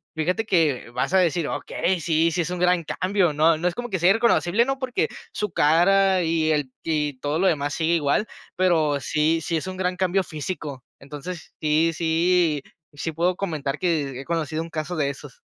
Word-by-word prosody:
fíjate 180 +8 -1
que 160 - +1
vas 125 +8 -2
a - - +5
decir: 170 -3 +1
"Okey, 185 0 -1
sí, 165 +1 +2
sí 165 - -2
es 165 - -3
un 180 0 -4
gran 180 -2 +2
cambio, 185 0 0
¿no?" 155 +2 +3
No 175 +3 -1
es 180 - -1
como 245 +1 -5
que 190 -4 -2
sea 175 +3 +5
irreconocible, 225 -2 +3
¿no?, 270 +2 -2
porque 260 -2 -1 0.2
su 210 -2 -3
cara 185 +5 +4
y 160 -1 +1
ella 150 -1 +1 0.2
y 150 -4 -1
todo 145 +4 -1
lo 190 - +3
demás 145 -4 0
sigue 165 +2 +1
igual, 150 +6 +1 0.3
pero 160 -6 +2
sí 155 +4 +1
sí 165 +2 -1
es 160 - -4
un 185 - -5
gran 180 -1 -2
cambio 190 +1 +1
físico. 150 -4 -6 0.2
Entonces 150 +5 -8
sí, 155 +2 +2
sí, 165 -1 +2 0.3
sí, 145 +3 -4
puedo 175 +3 0
comentar 150 -7 -3
que 145 -7 -1
he - - -9
conocido 160 -2 -2
un 165 - -7
caso 160 +2 -4
de 145 -4 0
esos. 140 - -10
165 Hz, 200 wpm, -24 LUFS, 150-180 Hz, 0.3 s, a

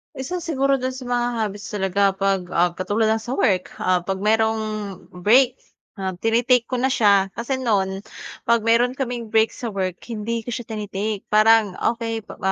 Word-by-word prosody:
Isa 295 +8 -4
siguro 275 -5 +1
do'n 255 0 -3
sa 255 -1 -8
mga 240 0 +1
hobbies 205 -1 -4
talaga 195 0 +1
'pag, 195 -1 0
ah, 175 +1 +3
katulad 215 +4 +1
ng 220 - +2
sa 250 - -3
work, 190 -9 +1
ah, 185 0 +3
'pag 195 0 -3
merong 220 +1 +2 0.5
break, 240 +8 +3 0.4
ah, 190 -1 -3
tini-take 235 +2 +2
ko 255 - -1
na 250 - +1
siya, 200 -7 +3
kasi 250 +3 -3
no'n 195 -6 0 0.5
'pag 235 -1 +3
meron 235 +3 +3
kaming 240 -4 -4
break 220 0 +4
sa 230 -4 -6
work 185 -2 -2
hindi 230 0 -4
ko 245 - -4
siya 240 0 -6
tini-take, 210 -1 -4
parang 215 -2 +5 0.2
okey, 225 -1 -3
pa - - -12
225 Hz, 175 wpm, -22 LUFS, 200-245 Hz, 0.5 s, parang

